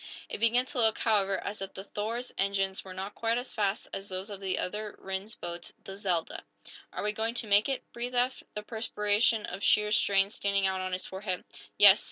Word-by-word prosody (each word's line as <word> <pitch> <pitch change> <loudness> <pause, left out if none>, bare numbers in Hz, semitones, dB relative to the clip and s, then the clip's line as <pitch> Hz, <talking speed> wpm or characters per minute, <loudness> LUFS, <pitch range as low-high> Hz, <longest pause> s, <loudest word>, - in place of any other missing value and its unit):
It - - -3
began 235 +3 +4
to 265 -1 -4
look, 220 -2 +4
however, 200 -3 +2
as 205 0 -4
if 195 - -5
the 190 - -6
"Thor's" 225 +5 -3
engines 195 -1 0
were 190 - -9
not 195 +2 -5
quite 230 +1 0
as 245 +1 -4
fast 205 -1 0
as 195 +1 -4
those 190 +2 -4
of 200 - -6
the 190 -2 -1
other 210 +3 -3
Rhinds 190 +3 -5
boat, 175 0 -6
the 195 - -8
"Zelda." 185 -5 -1 0.5
"Are - - -4
we 210 - +2
going 225 +2 -2
to 230 - 0
make 205 +3 +4
it?" 270 - -1
breathed 245 +1 -4
Eph, 250 +1 +2
the 210 - -4
perspiration 215 0 +1
of 195 +3 -6
sheer 210 0 +4
strain 200 -1 +3
standing 200 -2 +1
out 190 0 +1
on 185 0 -3
his 185 - -2
forehead. 190 -1 -4 0.3
"Yes!" 200 -1 +9
205 Hz, 215 wpm, -30 LUFS, 195-220 Hz, 0.5 s, Yes